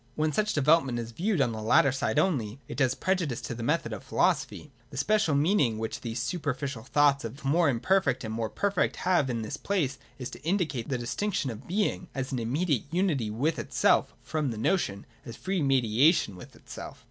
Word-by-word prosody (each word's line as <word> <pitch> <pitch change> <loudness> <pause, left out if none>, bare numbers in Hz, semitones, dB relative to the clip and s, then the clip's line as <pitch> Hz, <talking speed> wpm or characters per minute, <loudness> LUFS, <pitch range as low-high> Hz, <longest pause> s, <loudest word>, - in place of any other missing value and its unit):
When 155 0 0
such 210 +6 +1
development 145 -3 +3
is 115 -1 -5
viewed 185 - 0
on 125 -3 +2
the 110 -1 -5
latter 115 +5 +4
side 135 +2 -1
only, 135 - +1
it - - -6
does 130 -3 +2
prejudice 180 -10 -1
to - - -5
the 115 - -7
method 120 -2 0
of 105 - -7
philosophy. 150 - 0 0.2
The 135 - -9
special 210 -3 +2
meaning 145 - +2
which 110 +1 -4
these 115 0 -4
super 145 +1 -2
ficial 135 -4 -5
thoughts 145 -1 +3
of 130 +6 -7
more 160 +3 +3
imperfect 190 +11 +1
and 110 -1 -4
more 110 -1 -2
perfect 200 - 0
have 175 -7 +3
in 115 -2 -2
this 110 - -5
place 155 -10 -1 0.2
is 125 -2 -6
to - - -10
indicate 155 - -1
the 130 - 0
distinction 135 - -2
of 110 +3 -10
being, 190 -1 -1
as 135 0 -3
an 130 - -1
immediate 135 +3 0
unity 160 - 0
with 135 +10 -1
itself, - - +2
from 155 -3 -1
the 115 - -4
notion, 110 - 0 0.2
as 115 - -8
free 190 -2 -2
mediation 135 - +3
with 90 - -12
itself. - - -9
140 Hz, 200 wpm, -28 LUFS, 120-170 Hz, 0.2 s, latter